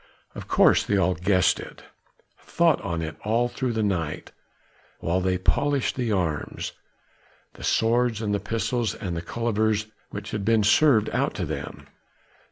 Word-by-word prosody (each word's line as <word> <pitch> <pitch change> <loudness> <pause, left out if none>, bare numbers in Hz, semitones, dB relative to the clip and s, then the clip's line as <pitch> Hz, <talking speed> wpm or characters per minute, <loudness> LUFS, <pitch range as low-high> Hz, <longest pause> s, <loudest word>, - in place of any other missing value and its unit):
Of - - -9
course - - +4
they 100 - 0
had - - +3
all 95 0 +2
guessed 90 +1 +2
it, - - -10 0.6
thought 170 -3 +2
on 85 -5 -3
it 80 0 -6
all 115 +3 +1
through 125 0 -3
the 110 -1 0
night 85 -7 -2 0.7
while 90 +3 0
they 90 0 +1
polished 140 +8 +1
the 120 -4 -1
arms 85 -7 -2 0.8
the - - -12
swords 115 0 +2
and 105 -2 -1
the 100 - +1
pistols 115 +2 -1
and 90 -5 -4
the 85 - -3
cullivers 110 +1 0 0.2
which 100 +2 -7
had 105 - -3
been 110 0 +3
served 110 0 +4
out - - 0
to - - -2
them. - - -6
105 Hz, 165 wpm, -25 LUFS, 95-115 Hz, 0.8 s, course